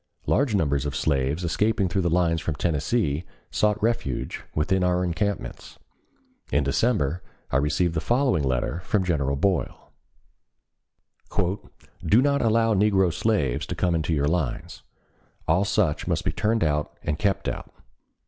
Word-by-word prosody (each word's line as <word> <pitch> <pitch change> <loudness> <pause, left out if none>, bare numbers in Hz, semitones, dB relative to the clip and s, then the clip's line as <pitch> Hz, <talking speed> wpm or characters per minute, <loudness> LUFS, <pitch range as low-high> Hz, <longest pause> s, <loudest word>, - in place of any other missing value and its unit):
Large 130 -6 +2
numbers 70 -6 +1
of 70 - -4
slaves 70 +3 0
escaping 100 +3 +1
through 95 +2 0
the 85 - +1
lines 85 -1 +2
from 80 - -2
Tennessee 80 - 0 0.3
sought 105 0 +1
refuge 110 - -1
within 90 +5 +1
our 90 0 +2
encampments. 100 +4 -3 0.7
In 70 - +2
November, 85 - +1 0.3
I 65 - +3
received 80 +4 +1
the 80 - -1
following 125 - +2
letter 65 +5 -1
from 95 +2 0
General 70 -6 0
Boyle: 95 +5 -1 2.1
"Do 105 +8 +4
not 140 +1 +2
allow 115 0 +3
negro 95 -3 +3
slaves 80 - 0
to - - -4
come 90 -2 +1
into 80 0 -1
your 75 -2 +1
lines. 80 -4 -2 0.7
All 85 +5 +3
such 100 -7 0
must - - -1
be - - +1
turned 110 +1 0
out 75 -1 -1
and 75 +1 -2
kept 100 -2 0
out. - - -4
85 Hz, 145 wpm, -25 LUFS, 75-105 Hz, 2.1 s, Do